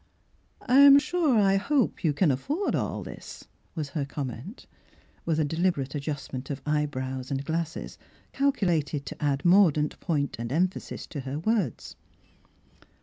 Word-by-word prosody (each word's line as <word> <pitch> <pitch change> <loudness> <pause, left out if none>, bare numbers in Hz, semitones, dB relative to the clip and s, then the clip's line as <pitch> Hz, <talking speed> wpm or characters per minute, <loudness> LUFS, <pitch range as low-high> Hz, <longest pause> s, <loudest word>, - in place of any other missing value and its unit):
"I 255 - +3
am 280 0 +10
sure 300 -3 +2
^ 195 -2 +4
hope 265 -2 0
you 160 - +3
can 150 +2 +2
afford 290 - -1
all - - -2
this," - - -10 0.3
was 155 -4 -3
her 150 -1 -2
comment, 140 - -6 0.6
with 160 -2 0
a 155 - +2
de 145 - -4
liberate 165 -7 0
adjustment 140 -3 -5
of 140 - -3
eyebrows 130 -4 -2
and 135 0 -3
glasses 160 +1 -4 0.3
calculated 170 - 0
to - - -7
add 140 0 0
mordant 175 -5 +4
point 145 -5 -1
and 115 +1 -4
emphasis 180 +6 -1
to 150 - -7
her 135 +1 -4
words. 185 - -2
155 Hz, 145 wpm, -27 LUFS, 140-195 Hz, 0.6 s, am